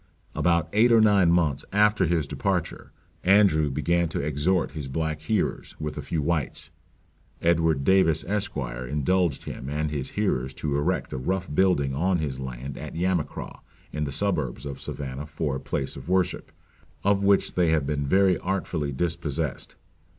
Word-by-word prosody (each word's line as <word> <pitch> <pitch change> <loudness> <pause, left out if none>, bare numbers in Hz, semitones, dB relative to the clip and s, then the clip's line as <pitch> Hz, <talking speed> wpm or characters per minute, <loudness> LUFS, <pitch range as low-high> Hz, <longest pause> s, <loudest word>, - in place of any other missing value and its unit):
About 85 -2 +2
eight 115 +4 +5
or 115 - +7
nine 100 -5 +5
months 85 -5 +1
after 105 -2 +3
his 80 -2 +1
departure, - - -2 0.3
Andrew 90 -6 +4
began 85 +5 +1
to - - -3
exhort 75 +5 0
his 75 -4 -5
black 80 +2 -2
hearers, 105 +7 -1
with 75 -1 -4
a 75 - -4
few 75 +2 -2
whites. 80 -2 -2 0.7
Edward 80 -4 +2
Davis, 85 -3 +3
Esq.; 100 -2 -2
indulged 70 +6 -1
him 65 - -6
and 75 +1 -2
his 70 -3 -3
hearers 65 +1 0
to 75 -2 -2
erect 85 +6 -1
a 65 - -3
rough 90 +4 -2
building 75 -6 +2
on 90 +6 +1
his 70 -5 -3
land 65 +1 -6
at - - -7
Yamacraw, 90 -1 -2 0.3
in 75 0 -1
the 70 - -4
suburbs 75 -7 -1
of 70 -1 -6
Savannah 70 +1 -5
for 75 -3 -2
a - - -6
place 70 0 -3
of 70 +4 -9
worship, 95 -1 0 0.5
of 100 0 +3
which 100 0 +3
they 90 -2 +2
have 80 -3 +2
been 70 0 -1
very 95 +2 +4
artfully 90 -6 -2
dispossessed. 80 -1 -2
80 Hz, 165 wpm, -26 LUFS, 70-90 Hz, 0.7 s, or